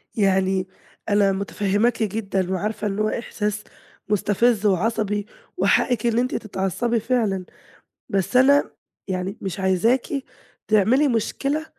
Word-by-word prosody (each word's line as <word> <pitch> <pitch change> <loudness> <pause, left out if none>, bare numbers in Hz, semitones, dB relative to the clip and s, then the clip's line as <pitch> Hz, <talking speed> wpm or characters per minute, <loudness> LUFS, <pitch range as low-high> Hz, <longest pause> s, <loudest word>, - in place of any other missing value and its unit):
يعني 190 -2 +1 0.4
أنا 205 -1 +4
مُتفهِّماكِ 205 +4 0
جدًا 195 -3 -2
وعارفة 210 +3 -2
إن 200 +1 -3
هو 215 0 +1
إحساس 210 -2 -3 0.5
مُستفِز 210 +2 +2
وعصبي 205 +1 +1 0.3
وحقِّك 240 -3 +2
إن 235 0 +2
أنتِ 250 +1 -1
تتعصّبي 215 +4 -1
فعلًا. 215 -5 0 0.6
بس 195 +5 +1
أنا 280 +3 +5 0.4
يعني 185 0 -3
مش 195 0 -4
عايزاكِ 190 +7 +2 0.6
تعملي 220 +7 +4
مشكلة 275 +5 -1
210 Hz, 110 wpm, -23 LUFS, 195-235 Hz, 0.6 s, أنا